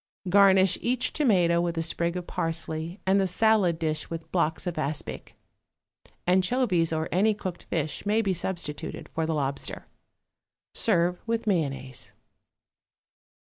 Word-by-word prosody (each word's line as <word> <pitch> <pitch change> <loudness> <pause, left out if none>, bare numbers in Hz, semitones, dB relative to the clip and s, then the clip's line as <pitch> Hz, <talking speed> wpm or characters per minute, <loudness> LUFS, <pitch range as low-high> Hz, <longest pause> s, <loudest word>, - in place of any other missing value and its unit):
Garnish 190 -1 +5
each 245 +1 +1
tomato 180 - +3
with 170 -1 -2
a 165 - +1
sprig 170 +1 0
of 180 - -5
parsley 165 +2 -3
and 195 +1 +3
the 190 - +1
salad 195 -3 +3
dish 155 -2 -2
with 165 -1 -7
blocks 160 -2 0
of 175 -3 -3
aspic. 150 0 -4 0.9
Anchovies 185 -1 +2
or 160 0 -1
any 210 +4 +3
cooked 185 -4 -6
fish 155 -3 -3
may 215 +2 +2
be 195 -2 +1
substituted 170 -4 -5
for 160 -1 -1
the 160 - 0
lobster. 140 -1 -3 0.9
Serve 175 -4 +1
with 230 0 -1
mayonnaise. 140 - -2
175 Hz, 135 wpm, -27 LUFS, 160-195 Hz, 0.9 s, Garnish